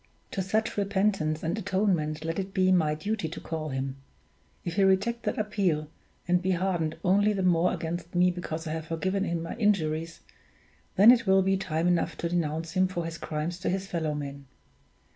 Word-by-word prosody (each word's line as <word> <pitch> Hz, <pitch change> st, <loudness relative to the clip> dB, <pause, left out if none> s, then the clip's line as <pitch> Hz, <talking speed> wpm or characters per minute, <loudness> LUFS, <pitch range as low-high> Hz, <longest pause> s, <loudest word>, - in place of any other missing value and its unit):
To 195 Hz, -, -2 dB
such 220 Hz, +4 st, -1 dB
repentance 195 Hz, -6 st, 0 dB
and 165 Hz, +4 st, 0 dB
atonement 180 Hz, -6 st, 0 dB
let 165 Hz, +2 st, -2 dB
it 195 Hz, 0 st, -5 dB
be 185 Hz, 0 st, +4 dB
my 160 Hz, -4 st, +3 dB
duty 200 Hz, +1 st, -2 dB
to 160 Hz, -, -7 dB
call 160 Hz, -1 st, -4 dB
him; 135 Hz, 0 st, -3 dB, 0.7 s
if 175 Hz, -, -2 dB
he 200 Hz, -, +5 dB
reject 195 Hz, +5 st, +2 dB
that -, -, -1 dB
appeal, 190 Hz, -8 st, 0 dB, 0.4 s
and 180 Hz, 0 st, +3 dB
be 190 Hz, +1 st, +1 dB
hardened 170 Hz, -3 st, -1 dB
only 205 Hz, +3 st, +3 dB
the 195 Hz, -2 st, -1 dB
more 180 Hz, -1 st, +3 dB
against 170 Hz, +1 st, -4 dB
me 180 Hz, +1 st, +4 dB
because 165 Hz, -2 st, -5 dB
I 155 Hz, -, -3 dB
have 160 Hz, 0 st, -4 dB
forgiven 190 Hz, +5 st, -1 dB
him 170 Hz, -2 st, -2 dB
my 165 Hz, -, -5 dB
injuries, 165 Hz, -7 st, 0 dB, 0.7 s
then 210 Hz, +5 st, +9 dB
it 235 Hz, -4 st, +2 dB
will 190 Hz, 0 st, +5 dB
be 195 Hz, +1 st, +2 dB
time 175 Hz, -3 st, -1 dB
enough 170 Hz, -1 st, +1 dB
to 170 Hz, -, -2 dB
denounce 165 Hz, -1 st, -1 dB
him 185 Hz, +2 st, +2 dB
for 175 Hz, -2 st, -4 dB
his 165 Hz, 0 st, -6 dB
crimes 155 Hz, +3 st, -3 dB
to 185 Hz, -, -1 dB
his 190 Hz, +1 st, -1 dB
fellow 165 Hz, -6 st, -2 dB
men. 140 Hz, -1 st, -6 dB
175 Hz, 195 wpm, -28 LUFS, 160-195 Hz, 0.7 s, then